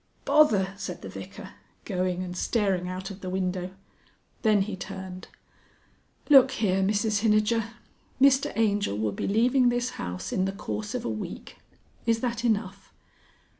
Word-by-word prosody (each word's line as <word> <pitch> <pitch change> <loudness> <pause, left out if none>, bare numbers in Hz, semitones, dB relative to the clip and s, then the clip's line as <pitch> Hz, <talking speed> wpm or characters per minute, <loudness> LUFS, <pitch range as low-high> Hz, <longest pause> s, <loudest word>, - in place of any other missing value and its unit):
"Bother!" 205 -11 +4
said 195 - -6
the - - -6
Vicar, - - -9 0.3
going 185 -2 -1
and 180 -1 -6
staring 190 -2 0
out 185 +2 -5
of 195 0 -10
the 185 - -5
window. 185 -1 -2 0.7
Then 210 -3 +4
he 200 0 -5
turned. 190 0 -8 1.0
"Look 270 -3 +8
here, 195 -6 0
Mrs 205 +2 +1
Hinijer! 215 +1 +1 0.4
Mr 270 0 +4
Angel 205 - +1
will 105 0 0
be - - -3
leaving 245 +5 +3
this 245 +1 -1
house 90 +1 -5
in 185 - +1
the 195 - -2
course 105 - -5
of - - -3
a - - -1
week. 110 -1 -6 0.5
Is 230 0 +3
that 235 -2 -2
enough?" 215 -4 -1
200 Hz, 150 wpm, -27 LUFS, 185-225 Hz, 1.0 s, Look